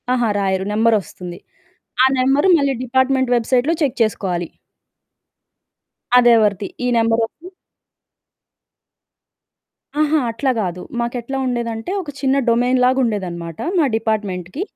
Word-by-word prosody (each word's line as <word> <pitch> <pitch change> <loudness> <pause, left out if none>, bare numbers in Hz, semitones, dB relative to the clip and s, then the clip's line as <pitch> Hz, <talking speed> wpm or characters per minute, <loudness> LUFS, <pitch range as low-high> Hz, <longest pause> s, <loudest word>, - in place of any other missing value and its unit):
అహా! 240 -3 +1
రాయరు. 190 -1 0
నెంబర్ 225 +1 +3
ఒస్తుంది. 175 -1 -9 0.7
ఆ - - +6
నెంబరు 270 +7 +3
మళ్ళీ 280 -1 +1
డిపార్ట్‌మెంట్ 260 0 +1
వెబ్‌సైట్‌లో 250 +6 +1
చెక్ 270 -4 -1
చేసుకోవాలి. 180 -6 -2 1.7
అదెవరిది? 215 -5 +3 0.2
ఈ - - +1
నంబరోరిది 230 +10 -1 2.5
అహా! 305 0 +3
అట్లా 240 +4 0
గాదు. 180 -3 -3 0.2
మాకెట్లా 240 +2 -3
ఉండేదంటే, 235 +2 -3
ఒక 325 - -9
చిన్న 270 -1 +1
డొమైన్ 245 +2 +2
లాగా 255 +1 +3
ఉండేదనమాట 175 -7 -3 0.2
మా 310 - +4
డిపార్ట్‌మెంట్‌కి. 210 - -3
230 Hz, 105 wpm, -19 LUFS, 205-260 Hz, 2.5 s, ఆ